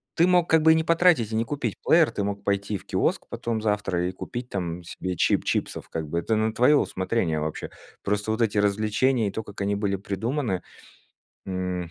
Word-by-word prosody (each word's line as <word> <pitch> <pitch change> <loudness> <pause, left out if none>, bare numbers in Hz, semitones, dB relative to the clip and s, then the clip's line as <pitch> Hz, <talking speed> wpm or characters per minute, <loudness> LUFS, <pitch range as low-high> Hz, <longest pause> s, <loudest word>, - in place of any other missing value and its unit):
Ты 170 +1 +4
мог 180 -2 +3
как 160 -1 +5
бы 160 +1 +6
и - - +6
не 160 - +1
потратить 165 -9 +3
и - - 0
не 115 - +2
купить 145 +4 -3
плеер, 160 -2 +5
ты 100 - -2
мог 100 0 -3
пойти 100 +1 -1
в - - -17
киоск - - 0
потом 115 -2 -3
завтра 105 -5 0
и - - -2
купить 120 +6 -6
там 90 -2 -4
себе 90 +2 -5
чип - - +2
чипсов - - -2
как 80 -2 -4
бы, 85 +3 -1
это 110 +6 0
на 110 +1 +1
твое 130 +6 +5
усмотрение 95 - 0
вообще. 75 0 -4 0.3
Просто 105 +1 -1
вот 110 +2 -1
эти 110 -2 +1
развлечения 110 +4 +2
и - - -2
то, 110 - -4
как 105 - -11
они 100 +1 0
были 100 -1 0
придуманы. 100 +1 -2 0.9
М, 90 -2 -3
105 Hz, 210 wpm, -25 LUFS, 95-120 Hz, 0.9 s, бы